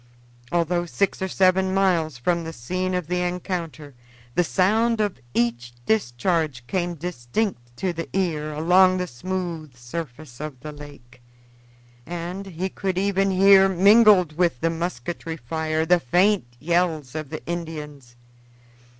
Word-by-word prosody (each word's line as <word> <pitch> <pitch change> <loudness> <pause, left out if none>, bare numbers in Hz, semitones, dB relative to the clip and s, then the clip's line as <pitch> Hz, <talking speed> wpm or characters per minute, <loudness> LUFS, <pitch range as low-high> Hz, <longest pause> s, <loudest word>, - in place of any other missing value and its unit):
Although 175 0 0
six 195 +3 -1
or 190 - 0
seven 190 0 +2
miles 170 -7 +1
from 170 +7 0
the 165 0 -6
scene 185 +9 -2
of 180 -2 -2
the 180 +2 -1
encounter, 175 -4 -4 0.4
the 175 - +3
sound 215 - +2
of 205 -3 -1 0.2
each 120 +1 0
discharge 155 - 0
came 175 +3 -2
distinct 140 - -4
to 185 +3 -1
the 165 0 -5
ear 160 -5 -1
along 180 +5 +4
the 180 - -1
smooth 170 -1 -5
surface 125 0 -7
of 150 -4 -6
the 150 - -7
lake, 140 -4 -13 0.9
and 175 +3 -5
he 185 0 -3
could 190 -1 -3
even 195 0 +1
hear, 195 0 +6
mingled 195 -3 +5
with 170 -7 +1
the 165 - +1
musketry 165 0 -4
fire, 160 +4 -2
the 175 +1 +4
faint 180 +8 +2
yells 160 -4 0
of 155 -3 -5
the 155 - -7
Indians. 150 -7 -6
170 Hz, 140 wpm, -23 LUFS, 150-185 Hz, 0.9 s, hear